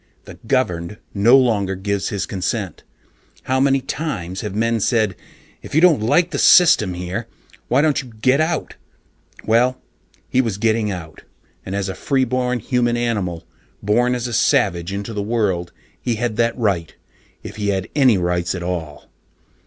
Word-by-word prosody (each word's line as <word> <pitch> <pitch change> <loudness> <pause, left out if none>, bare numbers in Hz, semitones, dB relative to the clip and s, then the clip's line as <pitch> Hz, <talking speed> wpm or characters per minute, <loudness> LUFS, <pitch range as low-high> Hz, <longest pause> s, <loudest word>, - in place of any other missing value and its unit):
The - - -12
"governed" 95 -8 -1 0.2
no 115 +6 +5
longer 105 -7 +1
gives 100 +1 -2
his 100 - -2
consent. 95 +1 -4 0.6
How 130 0 0
many 135 0 +3
times 100 - -4
have 105 -2 -5
men 115 +1 +1
said, 110 -3 +1 0.5
"If - - -8
you - - +6
don't 170 -10 +5
like 175 +11 +2
the 140 - -2
system 105 - +5
here, 90 +6 -4 0.4
why 135 +4 +3
don't 155 -2 +2
you 125 -3 -13
get 130 +6 +3
out?" 160 -1 -1 0.7
Well, 125 +3 +2 0.5
he 130 - +2
was 115 -6 -3
getting 110 0 +1
out, 80 -5 -7 0.4
and 95 - -5
as 100 -1 -2
a 95 - -3
freeborn 130 -1 0
human 120 +1 0
animal, 100 -8 -2 0.4
born 120 +5 +2
as 120 -1 -3
a 120 - -4
savage 100 - +1
into 100 +3 -5
the 105 - -2
world, 100 -6 -1 0.3
he 120 - -1
had 115 0 -2
that 115 +1 +1
right, 95 -9 -1 0.5
if - - -9
he 105 -1 -2
had 95 -2 -1
any 130 -8 +5
rights 90 0 -1
at 90 - -5
all. 80 -5 -5
110 Hz, 165 wpm, -20 LUFS, 95-125 Hz, 0.7 s, you